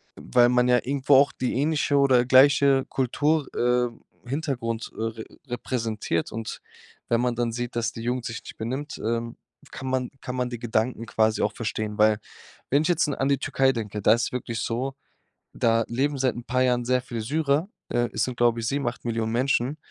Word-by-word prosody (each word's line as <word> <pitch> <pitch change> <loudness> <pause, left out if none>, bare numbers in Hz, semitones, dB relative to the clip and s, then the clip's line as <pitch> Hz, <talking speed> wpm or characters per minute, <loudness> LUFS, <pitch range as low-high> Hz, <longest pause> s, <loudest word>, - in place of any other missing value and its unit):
weil 120 -1 +3
man 125 0 +3
ja 125 - +5
irgendwo 140 +2 +2
auch 140 +2 +5
die 125 -1 -2
ähnliche 145 +1 +1
oder 130 -3 +4
gleiche 135 +1 +5
Kultur 145 +4 +1
äh, 125 0 +2 0.4
Hintergrund, 125 -6 -3
äh, - - -6
re 115 0 -4 0.2
repräsentiert. 115 -8 -2
Und 115 0 -6 0.5
wenn 115 0 +2
man 125 -1 +1
dann 120 -1 -1
sieht, 120 0 -4
dass 115 -3 0
die 115 - -7
Jugend 120 +1 -2
sich 115 - -5
nicht - - -11
benimmt, 130 +7 -4
ähm, 115 +1 -2 0.3
kann 130 0 -7
man 130 -1 -1
kann 125 - -5
man 125 -1 -1
die 120 - -5
Gedanken 115 0 -1
quasi 110 0 +1
auch - - +1
verstehen. 110 -2 -3
Weil 105 -1 +4 0.5
wenn 140 +3 +3
ich 160 - 0
jetzt 175 - +2
in 145 - -2
an 135 +1 0
die 140 - +2
Türkei 135 0 +2
denke, 105 -3 -4
da 105 - +6
ist 120 +1 0
wirklich 115 -3 -3
so, 130 +5 -2 0.6
da 115 -1 +2
leben 140 +4 0
seit 130 -2 +1
'n 120 - -7
paar 130 +1 +1
Jahren 125 -1 +2
sehr 125 0 +2
viel 120 -2 -5
Syrer. 150 - 0 0.2
Äh, 120 0 0
es - - 0
sind, 125 -2 -5
glaub 120 -1 +3
ich, 115 -1 -2
7, 140 -1 -1
8 120 - -4
Millionen 115 -1 -1
Menschen. 130 +3 +1
125 Hz, 200 wpm, -25 LUFS, 115-135 Hz, 0.6 s, da